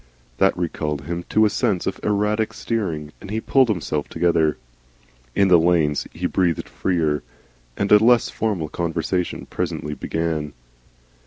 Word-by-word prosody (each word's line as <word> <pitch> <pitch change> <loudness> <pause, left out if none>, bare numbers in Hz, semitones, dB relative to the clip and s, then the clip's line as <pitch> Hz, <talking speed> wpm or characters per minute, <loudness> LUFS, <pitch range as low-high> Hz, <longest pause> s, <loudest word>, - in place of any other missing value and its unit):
That 95 - +3
recalled 75 -4 -2
him 85 +4 -5
to 110 0 +4
a - - +4
sense 95 -4 0
of 95 - -3
erratic 105 +1 0
steering, 85 -10 -3
and - - -9
he 110 +2 -1
pulled 130 +2 +3
himself 75 -6 -1
together. 80 -3 +2 0.8
In 100 - +4
the 90 -2 +6
lanes 80 -3 +2
he - - -5
breathed 85 -4 0
freer, 80 -6 0 0.6
and 100 - -1
a 105 +1 +7
less 120 0 +5
formal 100 -8 -1
conversation 85 +2 -2
presently 80 -4 -3
began. 80 0 -2
85 Hz, 145 wpm, -22 LUFS, 80-100 Hz, 0.8 s, a